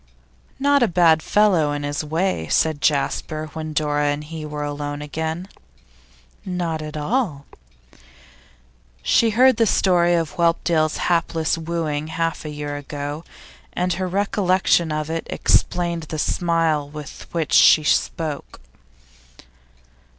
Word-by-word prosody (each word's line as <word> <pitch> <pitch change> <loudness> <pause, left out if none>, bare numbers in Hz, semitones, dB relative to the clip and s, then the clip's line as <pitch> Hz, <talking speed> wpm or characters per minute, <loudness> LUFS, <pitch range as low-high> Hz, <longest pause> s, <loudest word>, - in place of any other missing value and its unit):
'Not 285 0 +3
a 240 - +4
bad 165 -3 +4
fellow, 185 -8 +3
in 145 0 -4
his 145 +1 -2
way,' 160 - -1
said 155 -2 +1
Jasper, 155 +1 -1
when 155 -1 -5
Dora 150 -1 0
and 145 +1 -1
he 155 0 -7
were 150 0 -5
alone 145 0 -4
again. 160 +4 -4 1.0
'Not 175 -4 -3
at 155 0 -6
all.' 155 - -1 1.6
She 230 - +3
had 220 - -4
heard 260 -1 +6
the 230 -1 +3
story 175 -3 +3
of 165 -3 -2
Whelpdale's 165 -2 +1
hapless 165 -2 +1
wooing 160 -2 -3
half 165 0 -2
a - - -4
year 145 -1 -5
ago, 145 +2 -6 0.5
and 180 0 0
her 185 -1 -2
recollection 185 -3 +1
of 155 +1 -3
it 165 0 -4
explained 170 -2 0
the 155 - -4
smile 165 -3 0
with 150 -1 -9
which 165 -3 -2
she 155 - +7
spoke. 150 0 -1
160 Hz, 130 wpm, -21 LUFS, 150-175 Hz, 1.6 s, she